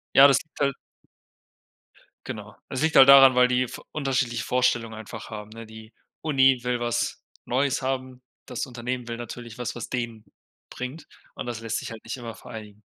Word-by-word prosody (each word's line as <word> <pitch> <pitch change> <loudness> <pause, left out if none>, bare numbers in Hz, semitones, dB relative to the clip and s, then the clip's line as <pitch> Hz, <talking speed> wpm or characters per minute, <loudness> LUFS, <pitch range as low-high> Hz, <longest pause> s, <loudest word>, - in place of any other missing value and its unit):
Ja, 135 +1 +10
das 140 - +4
liegt 155 - -19
halt 140 -2 +1 1.5
Genau. - - -7
Es 130 - -3
liegt 160 -1 +1
halt 135 0 +9
daran, 135 -2 +9
weil 125 0 +6
die 125 0 +1
v - - -9
unterschiedliche 130 -5 -1
Vorstellungen 125 -3 +1
einfach 110 -1 -8
haben, 105 -1 -7
ne? 115 +1 -9
Die 110 0 -13 0.3
Uni 135 -4 +4
will 125 -1 0
was 120 0 -1 0.2
Neues 135 +2 +1
haben, 130 -1 -3 0.2
das 125 - -4
Unternehmen 125 -1 -5
will 115 0 -4
natürlich 120 0 -8
was, 125 - -3
was 120 - -6
denen 120 -3 -4 0.4
bringt, 130 +5 -7 0.3
und - - -5
das 120 -2 -5
lässt 115 -2 -2
sich - - -7
halt 115 -1 -9
nicht 115 +4 -5
immer 115 -2 -7
vereinigen. 105 -2 -10
125 Hz, 180 wpm, -25 LUFS, 115-130 Hz, 1.5 s, Ja